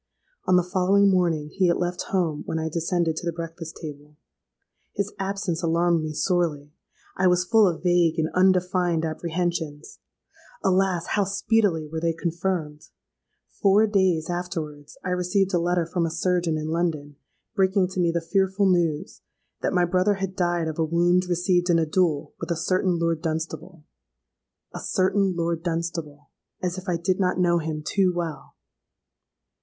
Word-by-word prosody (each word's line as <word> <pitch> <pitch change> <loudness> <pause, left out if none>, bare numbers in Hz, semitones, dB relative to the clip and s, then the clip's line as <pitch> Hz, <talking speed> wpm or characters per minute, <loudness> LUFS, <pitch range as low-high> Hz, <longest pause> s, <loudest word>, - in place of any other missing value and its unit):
On 185 - +4
the 180 - +4
following 195 +2 +3
morning 170 -5 +1
he 185 +4 +1
had 170 - +2
left 175 0 -2
home 170 -6 0
when 160 - -2
I 160 0 -2
descended 170 0 0
to - - -5
the - - +1
breakfast 165 0 -7
table. 150 -1 -9 0.8
His 200 +1 -2
absence 195 -3 -2
alarmed 170 0 +2
me 155 - -3
sorely; 155 -4 -1 0.4
I 185 - +3
was 180 0 +3
full 220 +1 +5
of 170 -1 -2
vague 175 -2 +3
and 160 -1 +1
undefined 180 -2 +2
apprehensions. 160 -2 -3 0.6
Alas! 185 -2 +2
how 205 -1 +1
speedily 195 -4 +1
were 160 +1 -4
they 165 0 +1
confirmed! 165 -2 -3 0.7
Four 200 +2 +5
days 190 -6 +1
afterwards 165 -5 -5
I - - -1
received 185 +2 +1
a 175 - +3
letter 175 0 +1
from 170 0 -1
a - - -2
surgeon 170 0 0
in 155 0 -4
London, 155 -4 -2 0.4
breaking 190 -2 +2
to 185 - -5
me 175 -1 +3
the 170 0 -1
fearful 195 +1 +2
news 170 -5 0 0.4
'that - - 0
my 180 -1 +3
brother 185 +3 +2
had 190 -1 -4
died 175 -2 0
of 160 0 -5
a - - +3
wound 175 +3 +2
received 175 0 +1
in 170 - +5
a 165 - +2
duel 155 -3 0
with 165 - -5
a 170 - +1
certain 185 +1 +1
Lord 165 -1 0
Dunstable.'—A 155 - -8
certain 190 0 +1
Lord 170 -1 -1
Dunstable;—as 165 +1 -5
if 185 +1 -7
I 175 - +1
did 180 +3 0
not 180 -2 +1
know 170 -1 +3
him 155 -1 -4
too 190 +2 +2
well! 170 -3 -5
175 Hz, 160 wpm, -24 LUFS, 160-185 Hz, 0.8 s, full